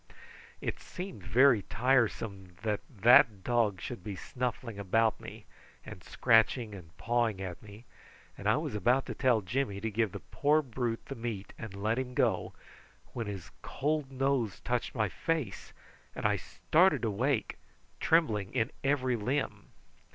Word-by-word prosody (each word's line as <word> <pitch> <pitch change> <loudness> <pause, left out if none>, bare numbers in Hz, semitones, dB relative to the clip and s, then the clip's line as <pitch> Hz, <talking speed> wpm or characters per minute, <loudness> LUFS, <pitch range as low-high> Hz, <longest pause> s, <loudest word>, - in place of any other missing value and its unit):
It - - -3
seemed 185 - -7
very 120 +4 +5
tiresome 105 -6 0
that 105 -2 0
that 115 -2 +5
dog 115 -6 +1
should 120 -2 -6
be 100 -1 -5
snuffling 120 0 -4
about 110 +3 +2
me, - - -10 0.4
and - - -10
scratching 115 0 +3
and 85 -5 -12
pawing 115 -3 0
at 90 -3 -6
me, 105 +2 -13 0.5
and - - -2
I - - +4
was - - -3
about 120 +6 +2
to - - -5
tell 125 -4 +2
Jimmy 100 +1 -2
to 110 +2 -3
give 110 -1 +1
the - - -6
poor 150 +2 +1
brute 120 -3 -3
the - - -6
meat 115 -5 -5
and 110 -4 -8
let 110 +5 0
him 125 -1 -4
go, - - +1 0.6
when 115 -3 -4
his 100 -4 -7
cold 150 -1 -2
nose 130 -7 0
touched 125 +1 -2
my 110 -3 +1
face, 145 - -3 0.4
and - - -5
I - - +4
started 155 -6 +2
awake, 115 +3 0 0.4
trembling 110 - +2
in 110 +5 +1
every 130 -3 +1
limb. 130 +6 -2
115 Hz, 150 wpm, -31 LUFS, 105-130 Hz, 0.6 s, very